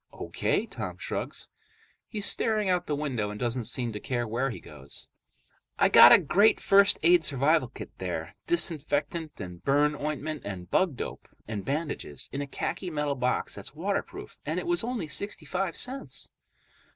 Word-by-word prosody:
"O.K." - - -1
Tom - - -6
shrugs. - - -3 0.6
He's 210 -2 0
staring 215 -4 +2
out 180 -1 0
the 150 - 0
window 130 -8 -2
and 105 0 -7
doesn't 120 0 -1
seem 120 -1 0
to 105 - -5
care 120 +1 -2
where 120 +5 -1
he 120 - -6
goes. 65 +2 -10 0.7
"I - - +4
got - - +10
a - - +11
great 210 +3 +4
first 200 +1 +5
aid 175 0 +6
survival 155 +3 +2
kit - - -9
there. - - -4
Disinfectant 155 - 0
and 90 -1 -8
burn 145 +2 +3
ointment 150 +1 -3
and 95 -3 -6
bug 185 -7 +2
dope - - -6 0.2
and 105 -2 -4
bandages, 145 - -3
in 140 - -2
a 140 - -4
khaki 175 +6 -3
metal 150 -3 -1
box 125 -2 0
that's - - -5
waterproof, 205 - -4
and - - -2
it - - -5
was 345 -6 +1
only 240 -6 -2
sixty 200 +6 -2
five 185 -2 -2
cents." 265 +2 -5
150 Hz, 170 wpm, -28 LUFS, 125-190 Hz, 0.7 s, a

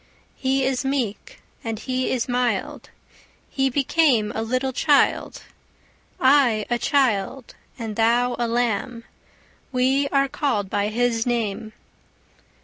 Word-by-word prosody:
He 265 0 0
is 260 0 -1
meek, 270 - -3 0.2
and 225 -1 -3
He 255 +3 -2
is 250 -2 -1
mild, 245 -1 -2 0.6
He 270 -1 +1
became 270 -4 +2
a 220 - -3
little 255 +3 -1
child. 290 +2 +1 0.8
I 260 -6 +4
a 240 - +1
child, 255 -3 0 0.2
and 225 -3 -5
thou 240 +2 +2
a 240 - 0
lamb, 235 0 -1 0.7
We 265 +2 +2
are 275 -1 +2
callèd 235 -9 -2
by 205 0 0
His 230 +1 0
name. 220 -2 -2
245 Hz, 120 wpm, -23 LUFS, 225-270 Hz, 0.8 s, I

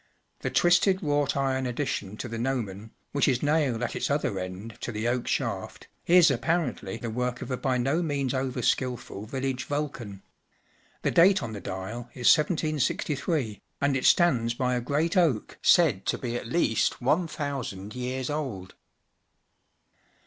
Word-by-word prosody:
The - - -2
twisted 180 +2 +3
wrought 145 -2 +1
iron 130 -1 0
addition 120 -6 -3
to - - -5
the 115 -1 -5
gnomon, 110 -5 -3 0.2
which 140 - +2
is 125 -2 +1
nailed 145 -6 +1
at 120 - -2
its - - -1
other 130 -8 0
end 95 +5 -7
to - - -3
the 110 +1 -2
oak 120 0 -1
shaft, - - -3 0.2
is 175 -3 +7
apparently 125 - -1
the 115 -1 -5
work 125 +1 -2
of - - -7
a 125 - -1
by 130 -1 0
no 135 +7 +1
means 140 -5 -1
over 130 -2 -2
skilful 120 -5 -1
village 130 +1 -3
Vulcan, 130 -9 -4 0.8
The - - +1
date 190 +4 +5
on 110 - -5
the 100 - -6
dial 110 +7 -6
is 125 -2 +6
1763, 150 - -1 0.2
and 140 -1 +2
it 130 - -1
stands 120 -10 +4
by 125 0 0
a 125 - 0
great 150 - 0
oak 160 - +1
said 155 - +4
to - - +1
be 120 -2 -4
at 120 - -4
least 115 -6 +1
one 155 +8 +2
thousand 125 -10 -5
years 125 +2 -3
old. 120 -12 -4
130 Hz, 165 wpm, -27 LUFS, 115-145 Hz, 0.8 s, is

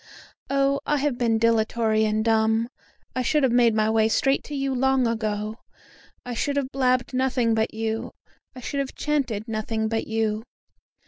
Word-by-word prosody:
Oh! 275 0 +2
I 295 - +2
have 275 -3 -1
been 230 -2 +2
dilatory 220 -1 +2
and 215 +1 0
dumb; 225 +1 +2 0.5
I 255 - 0
should 295 +4 +1
have 260 - +3
made 235 -2 +4
my 215 0 +2
way 220 0 +3
straight 270 +4 +2
to 295 - -6
you 275 -1 -1
long 265 0 +2
ago; 215 -1 -2 0.7
I 245 - -4
should 280 +4 -1
have 270 -1 -1
blabbed 255 -1 +1
nothing 255 -3 +1
but 220 0 0
you, 220 0 -3 0.4
I 255 - -9
should 280 - -3
have 275 -1 -3
chanted 260 -8 -1
nothing 220 0 -2
but 225 0 -2
you. 220 -1 -1
230 Hz, 175 wpm, -24 LUFS, 220-265 Hz, 0.7 s, made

